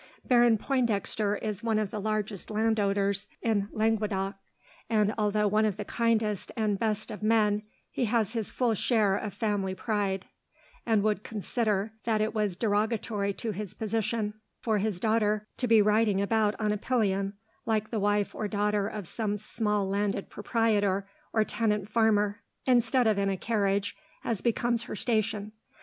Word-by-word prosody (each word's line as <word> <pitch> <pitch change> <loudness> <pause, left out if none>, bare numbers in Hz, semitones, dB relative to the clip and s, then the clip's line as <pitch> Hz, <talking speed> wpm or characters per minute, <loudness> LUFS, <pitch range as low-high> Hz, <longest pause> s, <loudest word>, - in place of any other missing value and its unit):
Baron 240 -2 +5
Pointdexter 215 -4 0
is 210 -2 -2
one 225 -2 +1
of 215 -2 -1
the 210 - -4
largest 215 -2 -2
landowners 205 -2 +1 0.2
in 210 -3 +1
Languedoc, 210 -3 0 0.6
and 210 -2 +2
although 210 -1 +1
one 215 +2 +3
of 210 -3 0
the 210 - -4
kindest 220 -4 0
and 210 -3 0
best 215 -1 -1
of 210 - -7
men, 210 -1 +3 0.3
he 250 - 0
has 220 -1 +1
his 225 -3 -2
full 245 -3 +1
share 210 -2 +2
of 210 +1 -3
family 200 -3 -1
pride, 195 -2 -1 0.6
and 220 -3 +3
would 210 -2 +1
consider 215 -1 -1
that 220 -2 +2
it 215 0 0
was 210 -4 0
derogatory 210 0 0
to 225 +2 -4
his 205 -1 -5
position 220 -1 -1 0.3
for 220 -3 0
his 205 -3 -1
daughter 215 0 +1
to 250 - -1
be 225 -2 +6
riding 210 -1 +3
about 210 +1 +1
on 215 -1 +1
a 210 - 0
pillion, 200 -4 0 0.3
like 215 -1 0
the 225 - 0
wife 205 0 +1
or 215 - -3
daughter 205 0 0
of 210 -4 -5
some 210 0 -1
small 210 -1 -1
landed 200 0 -1
proprietor 205 -3 +1 0.2
or 220 - +3
tenant 210 -2 0
farmer, 210 -1 +2 0.2
instead 250 0 +3
of 215 -2 +3
in 195 0 +1
a 195 - -1
carriage, 200 -2 0 0.3
as 225 -5 -1
becomes 235 0 +1
her - - -6
station. 215 -1 -1
210 Hz, 165 wpm, -28 LUFS, 205-225 Hz, 0.6 s, be